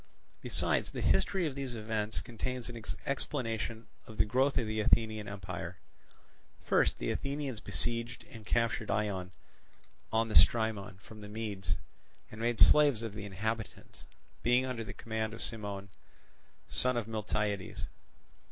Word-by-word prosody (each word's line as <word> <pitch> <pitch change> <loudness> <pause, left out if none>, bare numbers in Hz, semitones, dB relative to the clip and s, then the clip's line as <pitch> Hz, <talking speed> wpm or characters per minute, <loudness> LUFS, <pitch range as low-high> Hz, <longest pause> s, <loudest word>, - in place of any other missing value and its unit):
Besides, - - +1
the - - -5
history 190 -3 +3
of 150 - -1
these 135 -3 -4
events 110 -1 -1
contains 125 +1 -4
an 115 -2 -7 0.2
explanation 115 -4 -2 0.2
of 110 - -10
the - - +4
growth 130 +6 +2
of 120 - +2
the 110 0 -2
Athenian 110 -1 +3
empire. 90 -3 -5 0.9
First - - +3
the - - -1
Athenians 140 -4 -2
besieged 120 +1 -1
and 115 -2 -12
captured 115 0 +1
Eion 100 -4 0 0.8
on 115 +1 +2
the 110 - -5
Strymon 105 -5 +4
from 110 -1 -11
the 105 - -8
Medes, 105 -3 -2 0.6
and 110 - -8
made 120 -1 +1
slaves 145 -7 +7
of 110 -3 -4
the 105 -1 -6
inhabitants, 110 +3 -4 0.4
being 125 +2 +4
under 125 -3 -3
the 110 - -6
command 110 -1 -3
of - - -10
Cimon, 100 -3 -2 0.8
son 125 -1 +2
of 115 -2 -1
Miltiades. 105 -3 -2
110 Hz, 145 wpm, -32 LUFS, 105-120 Hz, 0.9 s, slaves